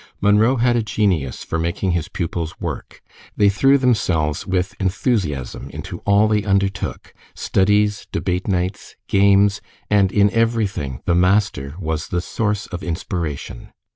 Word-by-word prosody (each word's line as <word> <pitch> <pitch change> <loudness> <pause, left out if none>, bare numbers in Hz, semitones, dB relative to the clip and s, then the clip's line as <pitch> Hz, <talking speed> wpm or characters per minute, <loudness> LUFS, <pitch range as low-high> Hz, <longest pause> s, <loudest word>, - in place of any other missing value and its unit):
Munro 105 +5 +4
had 120 0 +2
a 120 - +2
genius 95 - -1
for 80 - -3
making 85 +3 -1
his 85 -3 -1
pupils 85 -2 -4
work. - - -6 0.3
They 100 -1 +5
threw 135 +8 +4
themselves 95 - 0
with 90 -1 -1
enthusiasm 90 - -1
into - - -7
all 100 +1 +5
they 105 -1 +1
undertook 100 -1 -1 0.2
studies, 105 +1 +1
debate 90 0 -2
nights, 95 0 -2
games, 100 0 +4 0.3
and 100 -2 +4
in 100 0 +3
everything 110 - -1
the 90 - +2
master 90 -6 +1
was 80 -2 -3
the 90 - -1
source 105 +3 -2
of 90 -2 -7
inspiration. 85 -7 -5
95 Hz, 140 wpm, -20 LUFS, 85-105 Hz, 0.3 s, They